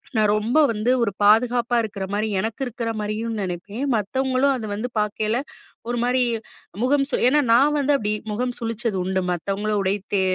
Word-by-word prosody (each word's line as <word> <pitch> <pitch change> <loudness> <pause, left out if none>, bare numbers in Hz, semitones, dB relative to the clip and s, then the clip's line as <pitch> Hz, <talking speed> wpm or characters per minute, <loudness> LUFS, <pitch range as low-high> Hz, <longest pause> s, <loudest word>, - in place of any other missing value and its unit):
நான் 215 -1 +3
ரொம்ப 235 +8 +1
வந்து 220 +3 0
ஒரு 200 - 0
பாதுகாப்பா 240 +3 +4
இருக்கற 205 -3 -5
மாரி 215 +2 0
எனக்கு 220 +5 -3
இருக்கிற 230 -1 -4
மாதிரியும் 215 +1 -3
நினைப்பேன். 195 +7 -4
மத்தவங்களும் 260 +5 +1
அத 225 -3 -5
வந்து 220 +4 -3
பார்க்கையில 215 +2 0 0.5
ஒரு 240 - -1
மாரி 250 +1 +2 0.6
முகம் 275 +1 +3
சுலி 245 - +1
ஏன்னா, 295 +2 +4
நான் 290 +5 +4
வந்து 285 +1 +2
அப்பிடி 210 -2 -1 0.2
முகம் 245 +3 -2
சுழிச்சது 230 -3 -2
உண்டு. 190 0 0
மத்தவங்கள 200 +4 -2
உடை 195 +1 +1 0.2
தே 195 - +3
225 Hz, 170 wpm, -23 LUFS, 210-250 Hz, 0.6 s, பாதுகாப்பா